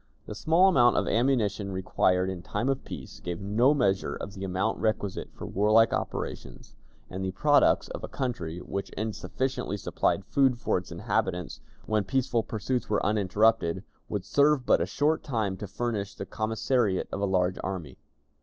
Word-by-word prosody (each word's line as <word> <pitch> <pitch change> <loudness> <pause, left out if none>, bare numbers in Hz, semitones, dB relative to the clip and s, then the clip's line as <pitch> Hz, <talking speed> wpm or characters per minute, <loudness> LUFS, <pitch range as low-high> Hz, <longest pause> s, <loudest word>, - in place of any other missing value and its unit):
The - - -6
small 165 - +4
amount 120 -10 +5
of - - +1
ammunition 110 -5 +1
required 95 0 +1
in 95 -2 -4
time 105 +7 -2
of 135 -1 -1
peace - - -9
gave 85 0 -5
no 110 +7 +3
measure 100 -8 +1
of 100 - -7
the 100 -1 -7
amount 95 +3 -1
requisite 105 -3 -1
for - - -9
warlike 110 +3 +4
operations, - - -5 0.3
and 95 +1 -5
the 95 - -1
products 145 +8 +4
of - - -7
a - - -3
country, 90 -11 -3
which 100 - -4
insufficiently 110 +2 -2
supplied 100 0 0
food 135 -3 +2
for 95 - +1
its 90 - -13
inhabitants 85 +1 -2 0.2
when 110 -1 +1
peaceful 125 +2 0
pursuits 115 +3 -3
were 105 - +1
uninterrupted, 100 -2 +2 0.3
would 105 -3 -3
serve 145 -2 +3
but - - +4
a - - 0
short 155 +2 +1
time 110 -8 -1
to 105 - -6
furnish 105 -1 -3
the - - -6
commissariat 110 -2 0
of 100 - -3
a - - +2
large 90 -1 +1
army. 90 -8 -5
105 Hz, 170 wpm, -28 LUFS, 95-125 Hz, 0.3 s, amount